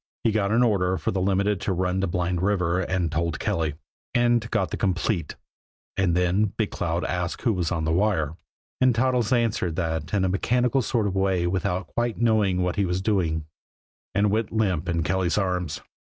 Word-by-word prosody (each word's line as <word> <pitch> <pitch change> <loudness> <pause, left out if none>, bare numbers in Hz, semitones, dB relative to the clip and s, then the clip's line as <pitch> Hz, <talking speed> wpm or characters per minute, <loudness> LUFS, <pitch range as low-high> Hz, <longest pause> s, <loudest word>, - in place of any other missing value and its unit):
He 115 - +3
got 105 -2 +1
an 115 +2 +4
order 95 -5 +2
for 75 - -2
the 95 - -1
Limited 100 +1 +1
to 95 - -1
run 90 +1 0
to 95 - 0
Blind 90 0 -1
River 90 -3 +1
and 90 -3 -1
told 85 0 -1
Kelly, 80 -3 -1 0.4
and 120 -2 +2
got 105 -5 0
the - - -1
"complete" 90 -3 -1 0.6
and 90 -3 +1
then 90 +4 +2
Big 110 -3 0
Cloud 85 +1 -2
asked 90 -1 -3
who 115 - +2
was 90 -4 -1
on 85 -3 -1
the 80 - 0
wire, 85 -4 +1 0.5
and 130 -2 +4
Toddles 125 -2 +1
answered 115 -9 +1
that 80 -3 -2
in 100 -2 +1
a - - +2
mechanical 125 +7 +1
sort 115 -1 0
of 100 -2 -1
a - - +1
way 95 -2 +1
without 90 +1 -1
quite 120 +5 -2
knowing 105 -6 +2
what 90 +2 -1
he 100 - +2
was 90 +1 -1
doing 90 -6 0 0.7
and 100 0 +3
went 110 0 0
limp 95 -9 0
in 85 -1 0
Kelly's 95 +2 0
arms. 90 -5 -1
95 Hz, 195 wpm, -25 LUFS, 85-105 Hz, 0.7 s, an